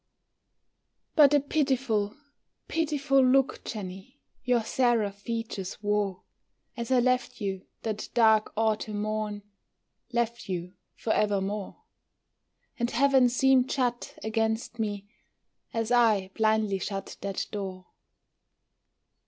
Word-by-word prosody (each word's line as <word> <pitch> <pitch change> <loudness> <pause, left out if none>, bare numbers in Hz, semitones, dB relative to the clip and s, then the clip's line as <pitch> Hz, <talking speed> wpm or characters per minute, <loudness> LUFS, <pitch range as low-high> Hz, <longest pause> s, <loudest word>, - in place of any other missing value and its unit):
But 290 -3 +7
a - - +6
pitiful, 265 -8 0 0.5
pitiful 290 -4 +2
look, 265 +1 +3
Jenny, 195 +5 -7 0.2
Your 245 -2 +2
seraph 220 -5 +1
features 220 -4 -4
wore, 205 -2 0 0.5
As 235 0 -5
I 260 -1 +4
left 255 0 +1
you 195 -3 -4 0.2
that 215 -2 -3
dark 220 -2 +4
autumn 215 -1 0
morn, 215 -1 -3 0.7
Left 235 -2 -1
you 180 0 -4 0.2
forevermore; 205 -2 -1 1.0
And 235 0 +1
heaven 265 0 +4
seemed 260 +1 +3
shut 245 -3 -1
against 220 +1 -1
me 205 -2 -3 0.6
As 225 0 -2
I 215 -6 +3
blindly 215 -2 +1
shut 195 +1 -5
that 195 -1 -2
door. 190 -3 -5
220 Hz, 105 wpm, -28 LUFS, 205-250 Hz, 1.0 s, But